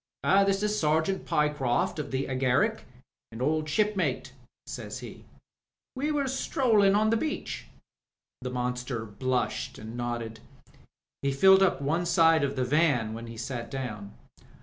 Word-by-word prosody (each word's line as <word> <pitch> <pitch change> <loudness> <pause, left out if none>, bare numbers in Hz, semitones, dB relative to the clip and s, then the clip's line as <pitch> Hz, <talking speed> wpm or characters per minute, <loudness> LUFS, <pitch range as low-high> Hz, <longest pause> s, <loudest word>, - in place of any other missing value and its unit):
"This 195 0 +3
is 210 0 0
Sergeant 160 +5 +1
Pritchard, 150 -5 0
of 145 -1 -4
the 135 +1 -1
Agaric, 135 - +1 0.5
an 115 - -9
old 155 +3 0
shipmate," 210 +4 0 0.3
said - - -7
he. - - -9 0.7
"We 285 +4 -1
were 295 -2 +1
stroUin* 245 -7 +2
on 215 +1 +2
the 230 - +3
beach." 310 +5 -4 0.7
The 125 - -4
monster 125 -1 -3
blushed 125 +4 -2
and 110 +2 -8
nodded. 120 -2 -4 0.8
He 140 - 0
filled 190 +8 +6
up 185 -7 +2
one 165 +5 0
side 165 -2 +4
of 140 0 -1
the 130 -1 0
van 130 -6 +2
when 115 +1 -7
he 115 0 -9
sat 120 0 -5
down. 105 -7 -6
145 Hz, 145 wpm, -28 LUFS, 125-195 Hz, 0.8 s, filled